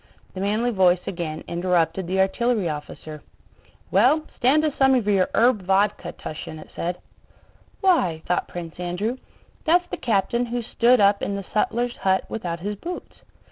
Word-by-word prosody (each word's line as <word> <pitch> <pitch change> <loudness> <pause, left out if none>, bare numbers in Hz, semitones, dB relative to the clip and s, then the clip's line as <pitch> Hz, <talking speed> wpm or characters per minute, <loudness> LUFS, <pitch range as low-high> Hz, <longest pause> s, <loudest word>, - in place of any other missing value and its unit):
The 185 - -5
manly 215 +5 +1
voice 185 -4 +3
again 165 -3 -4
interrupted 175 0 0
the 190 +2 -1
artillery 215 +1 +1
officer. 150 0 -7 0.7
"Well, 310 0 +4
stand 285 +5 +3
us 300 - 0
some 265 -1 +5
of 240 -5 +1
your 195 -3 +3
herb 235 -2 +4
vodka, 195 +2 +1
Túshin," 155 0 -8
it - - -12
said. 175 +1 -2 0.8
"Why," 185 - +2
thought 180 - 0
Prince 170 -1 -8
Andrew, 180 +8 -2 0.5
"that's 350 +2 +3
the - - -3
captain 235 +2 0
who 240 0 -3
stood 240 +2 +3
up 200 0 +4
in 200 - -2
the 200 -1 -5
sutler's 240 +3 0
hut 190 0 +1
without 170 -6 -4
his 205 +2 -4
boots." 350 - -7
200 Hz, 160 wpm, -23 LUFS, 175-240 Hz, 0.8 s, some